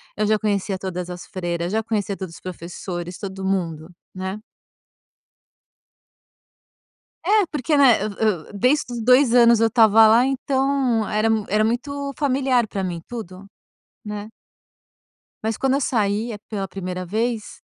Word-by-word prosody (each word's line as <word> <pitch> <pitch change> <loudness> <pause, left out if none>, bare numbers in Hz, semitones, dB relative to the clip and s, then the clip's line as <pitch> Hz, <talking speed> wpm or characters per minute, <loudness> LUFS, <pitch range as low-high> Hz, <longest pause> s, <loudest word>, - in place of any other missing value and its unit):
eu 210 0 0
já 215 0 +3
conhecia 205 -2 -1
todas 180 -1 -5
as 180 0 -7
freiras, 175 -2 -3
já 220 - +1
conhecia 210 -3 -2
todos 185 -4 -7
os - - -14
professores, 175 0 -6
todo 190 -1 -6
mundo, 170 -4 -2 0.2
né. 190 +1 -4 2.9
É, 410 +1 +3
porque 295 +1 0
né, 265 -7 +5
eu 215 - -2
eu 205 -8 -1
desde 250 +5 +1
os 235 - -4
2 250 +1 +5
anos 235 -2 +6
eu 225 - +4
estava 220 -1 +6
lá 235 +4 +5
então 270 -4 0
era 215 +1 +1 0.2
era 210 +2 +2
muito 280 +5 -2
familiar 265 -4 +2
pra 200 -2 -4
mim 175 -3 -3
tudo, 195 -5 -8 0.6
né. 210 0 -6 1.1
Mas 220 0 -1
quando 270 0 +1
eu 280 - +1
sai 220 -3 0
a 210 - -7
pela 195 -3 -4
1º 185 0 -5
vez 220 +4 -3
215 Hz, 145 wpm, -22 LUFS, 190-245 Hz, 2.9 s, anos